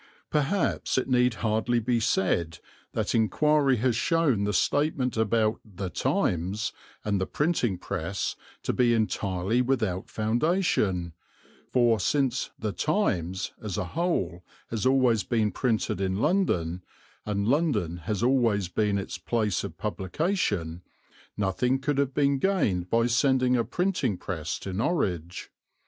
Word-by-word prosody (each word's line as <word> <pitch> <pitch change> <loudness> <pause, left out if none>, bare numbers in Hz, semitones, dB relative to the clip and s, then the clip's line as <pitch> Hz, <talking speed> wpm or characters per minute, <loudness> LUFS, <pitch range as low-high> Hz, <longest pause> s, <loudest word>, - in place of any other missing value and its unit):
Perhaps 150 +3 0
it 130 - +1
need 125 -2 +3
hardly 110 +2 +1
be 120 +1 +1
said 85 -6 0 0.4
that - - -1
inquiry 140 +5 +3
has 120 +1 +1
shown 135 -6 +2
the 105 - 0
statement 135 - +1
about 110 0 +1
The 95 -3 -6
Times 90 +6 0 0.3
and 100 -2 0
the 95 - -1
printing 145 - 0
press 85 +2 -3 0.3
to - - -1
be 120 -2 +3
entirely 105 0 0
without 110 -8 -1
foundation: 110 - 0 0.6
for, 120 -3 +3
since 130 +4 0
The 110 -1 -2
Times 95 - -1
as 105 -5 -4
a 105 - -1
whole 95 - -1 0.3
has 115 +2 0
always 125 -5 +3
been 110 0 +1
printed 110 -3 -1
in 95 -1 0
London, 90 - +1 0.4
and 100 -1 -1
London 120 - +1
has 100 +5 -3
always 115 -7 +2
been 105 +1 +1
its 100 - -5
place 110 -5 0
of - - -7
publication, 95 - -2 0.6
nothing 105 +6 +1
could 140 +1 -1
have 140 -1 0
been 140 -1 +2
gained 105 - +1
by 115 0 +3
sending 125 +1 +3
a 120 - +2
printing 175 - -1
press 80 -3 -4
to 95 - -5
Norwich. 90 - -2
110 Hz, 135 wpm, -27 LUFS, 95-130 Hz, 0.6 s, need